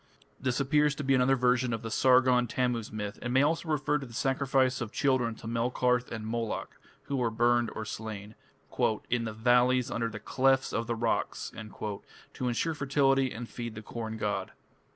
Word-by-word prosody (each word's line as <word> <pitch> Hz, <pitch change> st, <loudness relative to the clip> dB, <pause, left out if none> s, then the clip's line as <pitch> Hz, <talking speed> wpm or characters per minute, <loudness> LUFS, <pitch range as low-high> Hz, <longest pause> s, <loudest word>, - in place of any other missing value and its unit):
This 130 Hz, 0 st, -1 dB
appears 150 Hz, +2 st, +2 dB
to 145 Hz, -, -5 dB
be 135 Hz, 0 st, +2 dB
another 130 Hz, +1 st, +4 dB
version 125 Hz, -1 st, +2 dB
of 115 Hz, 0 st, -4 dB
the 115 Hz, -, -5 dB
Sargon 125 Hz, 0 st, +4 dB
Tammuz 120 Hz, -2 st, -1 dB
myth, 105 Hz, -1 st, -5 dB
and 120 Hz, -, -3 dB
may 130 Hz, +2 st, +4 dB
also 160 Hz, +2 st, 0 dB
refer 150 Hz, -1 st, +1 dB
to 135 Hz, -, -7 dB
the 115 Hz, -, -12 dB
sacrifice 135 Hz, -1 st, +1 dB
of 115 Hz, -3 st, -4 dB
children 130 Hz, -5 st, +1 dB
to -, -, -13 dB
Melkarth 125 Hz, +1 st, 0 dB
and 110 Hz, -1 st, -5 dB
Moloch, 115 Hz, 0 st, -3 dB, 0.3 s
who 140 Hz, -, -3 dB
were 120 Hz, -2 st, +1 dB
burned 120 Hz, +1 st, +2 dB
or 110 Hz, -, -4 dB
slain 110 Hz, -1 st, -6 dB, 0.8 s
"in 120 Hz, -1 st, +1 dB
the 110 Hz, -, -4 dB
valleys 125 Hz, +3 st, +3 dB
under 115 Hz, 0 st, -1 dB
the 110 Hz, -1 st, -7 dB
clefts 135 Hz, +4 st, +2 dB
of 115 Hz, 0 st, -1 dB
the 120 Hz, -, -1 dB
rocks" 115 Hz, 0 st, -1 dB
to 110 Hz, +3 st, -7 dB
ensure 125 Hz, +7 st, 0 dB
fertility 135 Hz, -2 st, +2 dB
and 115 Hz, +1 st, -6 dB
feed 115 Hz, -1 st, -6 dB
the 110 Hz, -, -8 dB
corn 110 Hz, 0 st, -5 dB
god. 100 Hz, -3 st, -2 dB
120 Hz, 185 wpm, -29 LUFS, 115-130 Hz, 0.8 s, another